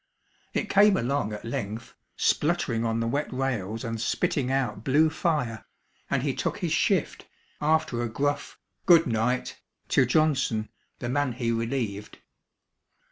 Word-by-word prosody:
It - - 0
came 205 0 +5
along 125 -2 -1
at 105 +1 -7
length, 115 0 -5 0.2
spluttering 145 -8 +1
on 115 0 0
the 115 - 0
wet 145 +5 -1
rails 115 -5 -2
and 115 -2 -3
spitting 130 +2 0
out 125 -6 -1
blue 150 +5 +3
fire, 150 -9 -1 0.5
and - - 0
he - - 0
took - - -2
his - - -2
shift - - 0 0.3
after 150 -5 +1
a 120 - -2
gruff 145 +5 -2 0.3
"Good 170 -2 +7
night" 120 +1 -1 0.3
to 130 - +4
Johnson, 135 -6 +1 0.3
the 120 - -5
man 145 -1 0
he 115 -1 -1
relieved. 115 -3 -3
125 Hz, 140 wpm, -27 LUFS, 115-145 Hz, 0.5 s, Good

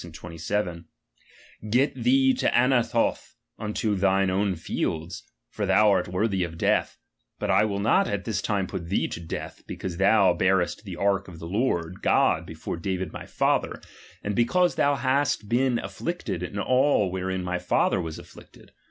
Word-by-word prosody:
26, 85 -1 -10
27): 85 +1 -3 0.8
Get 130 +6 +2
thee 265 +1 +3
to 260 - +1
Anathoth 120 -2 +1 0.2
unto 105 0 -1
thine 95 0 +2
own 95 0 0
fields 80 +1 -4 0.2
;for - - -4
thou 105 -1 +5
art 95 - +1
worthy 95 +1 0
of 85 -1 -6
death; - - +1 0.4
hut - - -2
v - - +4
Iwill 100 -1 -2
not 190 - +3
at 100 -1 -3
this 105 -4 -1
time 100 -3 0
put 85 -2 -6
thee 100 - +1
to - - -6
death, 85 - -7
because^' 90 -3 -5
ihou 100 -2 +4
barest 95 +2 +1
the 95 -3 -6
ark 100 +1 0
of 90 -3 -11
the 80 - -8
Lord 90 -3 -1
God - - +2
before - - -6
David 95 -1 -3
viy - - -9
father, - - 0 0.4
mid 105 - -2
because 175 - +2
thou 145 0 +2
hast 135 -4 0
been 125 +2 +2
af - - -7
Jiicted 120 - -3
in 90 +3 -5
all 130 -2 +2
wherein 95 0 -3
viy 90 0 -2
father 90 +1 +1
was 80 -2 -6
afflicted. - - -15
100 Hz, 170 wpm, -26 LUFS, 90-115 Hz, 0.8 s, thou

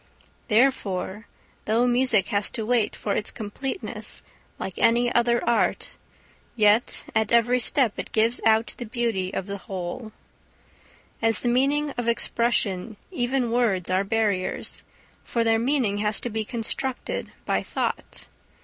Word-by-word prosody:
Therefore 215 -4 +1 0.4
though 225 +3 +2
music 245 -4 +3
has 205 -3 +1
to 220 - -4
wait 230 -2 +1
for 205 - -2
its 210 - -1
completeness 260 - -4 0.3
like 190 - -6
any 240 +1 +3
other 240 0 +2
art, 235 - +1 0.6
yet 215 +1 +3
at 220 0 +1
every 235 +2 +4
step 245 -2 +2
it - - -5
gives 225 +2 +2
out 220 +1 +3
the 240 - -6
beauty 225 -6 -1
of 190 - -3
the 200 0 -5
whole. 190 +5 -6 1.1
As 225 0 +2
the 240 - +1
material 280 +4 +2
of 240 - -2
expression 230 -3 0
even 250 -5 0
words 205 -7 +1
are 185 +1 +2
barriers, 200 -3 -1 0.4
for 235 - 0
their 225 0 +3
meaning 240 -5 +1
has 210 0 +1
to 240 - -4
be 220 0 -2
constructed 245 +3 -2
by - - +1
thought. - - -4
230 Hz, 140 wpm, -25 LUFS, 210-245 Hz, 1.1 s, every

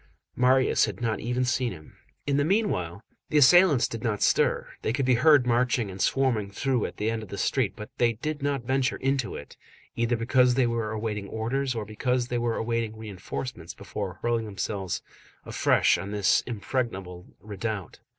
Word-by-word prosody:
Marius 130 +1 +3
had 105 -3 -6
not 115 -2 -1
even 125 +2 -1
seen 125 -1 0
him. 75 -4 -12 0.3
In 140 -1 +1
the 145 - +3
meanwhile, 145 - 0 0.3
the 155 - +2
assailants 150 0 +6
did 115 - -6
not 110 -3 -1
stir, - - +2
they - - -1
could 135 0 0
be 130 - +4
heard 140 +2 +5
marching 120 -3 +1
and 95 +1 -7
swarming 125 -7 +1
through 125 +4 -1
at - - -11
the 110 +2 0
end 115 -1 -3
of 110 - -10
the 100 - -6
street 105 +1 0
but 105 -1 -9
they 120 -1 +3
did 150 +6 -4
not 140 -3 -1
venture 130 +2 0
into 135 -2 -1
it, 70 - -10 0.4
either 115 +1 +1
because 125 +2 +3
they 130 -1 +3
were 115 -2 -1
awaiting 105 -2 -3
orders 130 +4 -2
or 110 -2 -3
because 125 +3 -1
they 120 - -1
were 120 -1 0
awaiting 115 -1 -2
reinforcements 100 -3 -7
before 100 -2 -6
hurling 115 -1 0
themselves 100 -2 -4 0.4
afresh - - +3
on 95 - -6
this 100 -2 +2
impregnable 100 -6 -4
redoubt. 105 -2 -5
115 Hz, 180 wpm, -26 LUFS, 105-130 Hz, 0.4 s, assailants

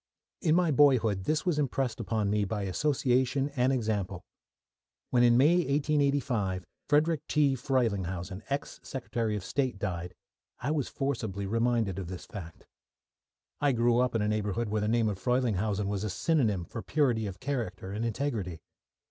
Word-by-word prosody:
In 160 -4 +3
my 175 -2 +3
boyhood 120 -9 +4
this 155 -1 0
was 170 -5 +1
impressed 135 -4 -1
upon 110 -2 -1
me 105 0 +2
by 100 +1 -2
association 130 - +1
and 125 0 +3
example. 105 -7 -1 0.9
When 125 - +4
in 120 -1 +6
May, 150 +7 +5
1885, 140 - +1 0.2
Frederick 150 +1 +3
T. 145 -2 +3
Frelinghuysen, 100 - -1
ex 140 +1 -3
Secretary 115 -3 -3
of 100 - -4
State, 130 -4 -1
died, 90 -3 -4 0.4
I 140 - -1
was 150 -4 0
forcibly 110 -8 -3
reminded 115 -2 +1
of 95 - -5
this 90 0 -7
fact. 85 -7 -9 0.9
I 145 -2 +3
grew 120 0 +3
up 125 -1 +1
in 110 - +2
a - - +1
neighbourhood 105 +1 -1
where 105 0 0
the 105 - 0
name 115 0 +2
of 100 -3 -2
Frelinghuysen 105 -3 0
was 100 0 -2
a 105 - -1
synonym 105 - +1
for 115 - -6
purity 125 -8 +1
of 95 -2 -7
character 110 -9 -3
and 105 +3 -3
integrity. 115 - -2
115 Hz, 160 wpm, -29 LUFS, 100-135 Hz, 0.9 s, in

